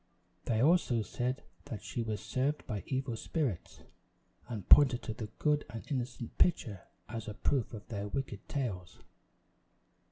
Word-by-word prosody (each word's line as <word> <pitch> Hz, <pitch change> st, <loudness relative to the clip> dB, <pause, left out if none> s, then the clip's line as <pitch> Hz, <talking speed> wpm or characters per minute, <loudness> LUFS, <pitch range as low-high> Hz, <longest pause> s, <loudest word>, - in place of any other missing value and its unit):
They 115 Hz, 0 st, +2 dB
also 145 Hz, -8 st, +4 dB
said 125 Hz, +5 st, -2 dB, 0.2 s
that 110 Hz, -, -6 dB
she 120 Hz, -, -3 dB
was 110 Hz, -2 st, -2 dB
served 140 Hz, +4 st, 0 dB
by 105 Hz, -6 st, -3 dB
evil 130 Hz, -2 st, -1 dB
spirits, 125 Hz, -, -2 dB, 0.7 s
and 110 Hz, -6 st, -5 dB
pointed 135 Hz, -4 st, +8 dB
to 110 Hz, -, -3 dB
the 110 Hz, -1 st, -5 dB
good 150 Hz, -1 st, +2 dB
and 115 Hz, -1 st, -6 dB
innocent 125 Hz, -3 st, -3 dB
pitcher 115 Hz, -, +2 dB, 0.2 s
as 115 Hz, -1 st, -5 dB
a 105 Hz, -, -4 dB
proof 130 Hz, -1 st, +1 dB
of 110 Hz, -3 st, -8 dB
their 100 Hz, -3 st, -3 dB
wicked 110 Hz, -4 st, -4 dB
tales. 95 Hz, -11 st, -3 dB
120 Hz, 150 wpm, -33 LUFS, 110-135 Hz, 0.7 s, pointed